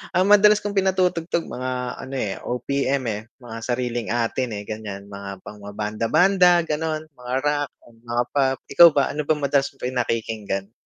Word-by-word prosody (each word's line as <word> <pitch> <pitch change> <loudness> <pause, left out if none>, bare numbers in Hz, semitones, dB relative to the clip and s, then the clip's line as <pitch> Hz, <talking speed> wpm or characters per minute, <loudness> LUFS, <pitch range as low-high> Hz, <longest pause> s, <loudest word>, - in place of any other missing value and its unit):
ang 185 - +4
madalas 210 0 +6
kong 205 - -2
pinatutugtog 180 -3 +1
mga 130 +1 -4 0.3
ano 135 +1 -7
eh, 105 -7 -2
OPM 135 +2 -1
eh, 105 0 -4 0.2
mga 115 -2 -8
sariling 120 0 -2
atin, 120 +2 0
eh, 100 - -5
ganyan, 105 -2 -6
mga 100 -1 -8
pang 105 - -10
mga 100 0 -10
banda, 105 +2 -2
banda 180 - +5
ganon, 155 0 -2
mga 125 -2 -8
rock, 145 -1 0 0.2
mga 120 +1 -2
pop. 135 -2 +2
Ikaw 170 - +9
ba 140 - +4
ano 150 -1 -4
ba 155 - +3
madalas 140 -1 +1
mong - - -17
pinakikinggan? 110 -5 -2
130 Hz, 170 wpm, -23 LUFS, 110-155 Hz, 0.3 s, Ikaw